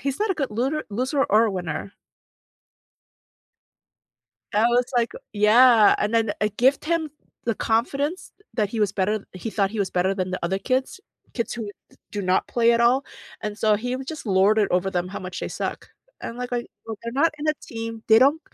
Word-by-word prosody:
he's 275 +5 -3
not 430 -2 +1
a - - +1
good 275 -6 -2
lunar 270 +7 -1
loser 260 +6 0
or 220 +2 +3
winner. 180 +1 -4 2.6
I 215 +2 +3
was 240 +1 +3
like, 235 -1 +1 0.2
"Yeah," 220 +2 +6
and 210 - -1
then 225 -2 +2
I 210 - +2
gift 255 +8 +2
him 320 -1 0 0.3
the 230 - 0
confidence 280 - -1 0.2
that 215 -4 +1
he 220 0 -4
was 205 -2 +2
better 205 +2 -1
he 185 +5 -6
thought 200 -2 0
he 220 - -5
was 195 - 0
better 185 +2 +1
than 185 -1 -2
the 185 - -2
other 190 +3 0
kids, 260 - -1 0.3
kids 235 - -2
who 220 -3 -5 0.2
d - - -24
do 205 - -4
not 185 0 +1
play 235 -1 +3
at 235 - +2
all, 250 +3 +3 0.4
and 210 0 -4
so 215 -1 +3
he 245 +4 -3
was 265 0 -7
just 310 -4 -7
lorded 200 +2 +3
over 180 +2 +1
them 180 0 -2
how 200 - -6
much 185 +2 -6
they - - -3
suck. - - -5 0.3
And, 230 - -6
like 250 0 -5
like, 240 -1 -2 0.2
well, 220 -1 -5
they're 235 0 -5
not 305 +5 +2
in 300 +1 -3
a 305 - +3
team, 225 -1 -6
they 220 0 +8
don't 285 +5 +4
225 Hz, 205 wpm, -24 LUFS, 205-255 Hz, 2.6 s, they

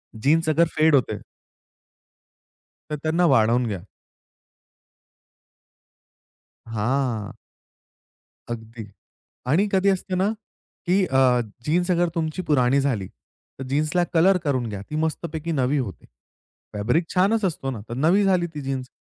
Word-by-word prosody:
Jeans 155 +8 +2
अगर 165 +2 +3
फेड 155 -1 +4
होते 130 - 0 1.7
तर - - 0
त्यांना 165 +3 +2
वाढवून 120 -4 +3
घ्या. 100 -4 -3 2.9
हां. 115 0 -1 1.2
अगदी 115 -1 -7 0.6
आणि 185 +9 +3
कधी 195 +1 +3
असते 190 -1 -1
ना 190 +3 +2 0.6
की 190 +2 +3
अ, 130 -4 +3 0.2
जीन्स 175 +4 +1
अगर 175 0 +2
तुमची 160 +2 -2
पुरानी 140 -5 +2
झाली, 120 -9 -1
तर 135 - -15
जीन्सला 155 +5 +1
कलर 180 +3 +5
करून 130 -6 0
घ्या, 100 -2 -6
ती 150 - -5
मस्तपैकी 160 +1 -3
नवी 140 -1 +1
होते. 120 -9 -4 0.7
फॅब्रिक 115 +11 +1
छानच 200 +4 +2
असतो 150 -7 -2
ना 120 - -6
तर - - -4
नवी 170 +9 +3
झाली 185 -3 +2
ती 150 - -4
जीन्स. 135 -1 -4
150 Hz, 125 wpm, -23 LUFS, 125-175 Hz, 2.9 s, कलर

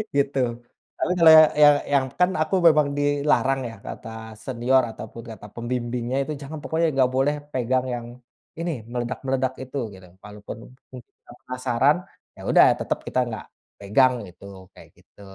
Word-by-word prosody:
gitu. 140 -1 +1 0.6
Lalu - - -1
kalo 165 -1 +8
ya 155 - +10 0.2
yang 145 0 +8 0.2
yang 135 -2 +3
kan 180 0 +4
aku 155 +5 0
memang 150 -2 +4
dilarang 145 -2 +1
ya, 115 - -10
kata - - -8 0.3
senior 125 +2 +1
ataupun 115 +1 -10
kata 105 - -12
pembimbingnya, 120 +2 -3 0.2
"Jangan! 150 +2 -7
Pokoknya 165 +1 0
nggak 130 -2 +3
boleh 140 +3 +2 0.2
pegang 130 0 0
yang 120 -1 -6 0.5
ini, 170 +1 -2 0.2
meledak-meledak 130 +2 -2
itu," 130 +2 -7
gitu. 95 -2 -14 0.2
Walaupun 105 0 -9 0.3
mungkin 125 -2 -13 0.3
penasaran, 130 +2 +1 0.4
ya - - -13
udah - - +6 0.2
tetep - - -2
kita - - 0
nggak 110 -2 -6 0.3
pegang 125 +6 +3
gitu, 95 +1 -13
kaya - - -16
gitu. - - -22
130 Hz, 150 wpm, -23 LUFS, 115-140 Hz, 0.6 s, ya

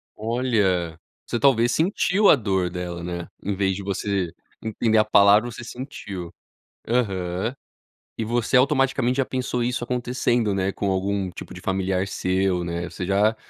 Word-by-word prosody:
Olha, 105 -8 0 0.3
você 120 - -2
talvez 120 -3 +4
sentiu 185 - +3
a - - +9
dor 95 -6 0
dela, 85 -1 -5
né, 85 -1 -4 0.2
em 100 0 -1
vez 95 -1 +1
de 100 - -6
você 100 -2 -1 0.3
entender 110 0 +1
a 110 - +5
palavra 105 +3 +5
você 120 - -8
sentiu. 105 - -7 0.5
Aham. 100 -2 -1 0.6
E 110 - -2
você 120 +2 +2
automaticamente 135 -2 +2
já 135 - +2
pensou 125 -2 -2
isso 125 0 -1
acontecendo, 120 -3 0
né, 95 0 0
com 100 0 -2
algum 95 0 -1
tipo - - -9
de - - -10
familiar 95 0 0
seu, 95 -1 0
né, 85 0 -3
você 90 - -5
já, 105 +3 +2
100 Hz, 155 wpm, -24 LUFS, 95-120 Hz, 0.6 s, a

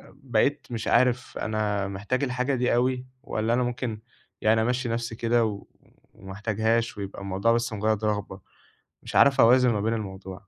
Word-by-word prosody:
بقيت 135 +2 0
مش 115 -2 -4
عارف 125 0 +2
أنا 105 -2 -1
محتاج 105 +8 -2
الحاجة 125 +1 0
دي 125 -1 +1
أوي، 125 +1 0 0.2
والَّا 110 -4 -1
أنا 125 +1 +2
ممكن 120 -3 -3 0.4
يعني 110 +1 +3
أمشّي 125 +1 0
نفسي 115 0 -3
كده 115 +1 +2
و 105 -2 -5 0.5
وما 95 0 -10
احتاجهاش 110 +3 0
ويبقى 100 -1 -6
الموضوع 100 +3 0
بس 115 -1 -1
مجرّد 110 0 0
رغبة، 105 -2 -2 0.6
مش - - -8
عارف 140 -1 +6
أوازن 125 +2 +6
ما 105 -2 -1
بين 110 +2 0
الموضوع. 95 -2 -7
115 Hz, 165 wpm, -26 LUFS, 105-125 Hz, 0.6 s, عارف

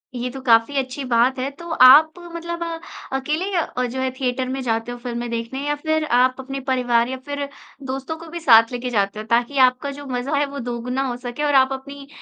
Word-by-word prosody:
ये 245 +1 -3
तो 270 - -8
काफ़ी 235 +2 +3
अच्छी 265 +1 -2
बात 250 +2 +2
है, 260 +2 -1
तो 340 +5 -11 0.2
आप 310 +5 +8 0.2
मतलब 340 0 -4
अ, - - -3 0.5
अकेले 310 +8 -2
अ, 310 -7 -1
जो 250 +2 -4
है 260 - 0
थिएटर 255 0 -2
में 265 +1 -3
जाते 225 -1 -2
हो 245 - -6
फ़िल्में 240 -1 -4
देखने 235 +3 -4
या 295 - +1
फिर 315 +1 -1
आप 255 0 +3
अपने 270 +1 -5
परिवार 245 -2 +2
या 260 - -4
फिर 285 0 -3 0.4
दोस्तों 270 +4 -4
को 335 +1 -11
भी 340 +1 -6
साथ 230 -7 +6
लेके 245 0 -3
जाते 205 -2 0
हो 215 - -6
ताकि 240 +4 +1
आपका 255 +3 -3
जो 285 +1 -9
मज़ा 260 +2 -2
है 290 - +2
वो 280 0 -7
दोगुना 245 +2 -3
हो 245 - -3
सके 245 +3 -5
और 290 -1 +2
आप 265 0 +5
अपनी 280 +1 -9
260 Hz, 225 wpm, -21 LUFS, 245-285 Hz, 0.5 s, आप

